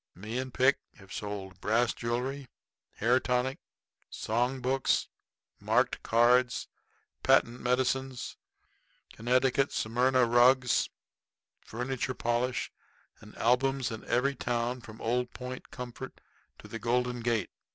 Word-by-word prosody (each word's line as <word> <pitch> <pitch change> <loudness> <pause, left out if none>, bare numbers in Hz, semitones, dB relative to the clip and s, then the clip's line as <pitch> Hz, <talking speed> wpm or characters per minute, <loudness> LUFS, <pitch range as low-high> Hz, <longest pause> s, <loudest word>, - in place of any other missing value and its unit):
Me 110 +7 -4
and 130 0 -4
Pick 130 +3 +3 0.2
have 100 -1 -13
sold 95 -3 -6
brass 115 +2 +2
jewelry, 125 +4 -3 0.5
hair 120 +4 +3
tonic, 125 +1 0 0.5
song 125 +4 -1
books, 130 +1 +1 0.5
marked - - +1
cards, 120 +2 +3 0.5
patent 120 - +3
medicines, 130 +1 0 0.8
Connecticut 130 +3 +2
Smyrna 125 +3 +2
rugs, 125 +1 +4 0.7
furniture 130 +2 -3
polish, 120 +1 -1 0.5
and - - -14
albums 130 +1 +2
in 110 - -6
every 135 +3 +1
town 120 -1 -2
from 110 -1 -12
Old 125 +2 -1
Point 125 0 -7
Comfort 125 +1 -8 0.4
to - - -13
the 115 - -6
Golden 125 +1 0
Gate. 115 -4 0
125 Hz, 110 wpm, -30 LUFS, 115-130 Hz, 0.8 s, rugs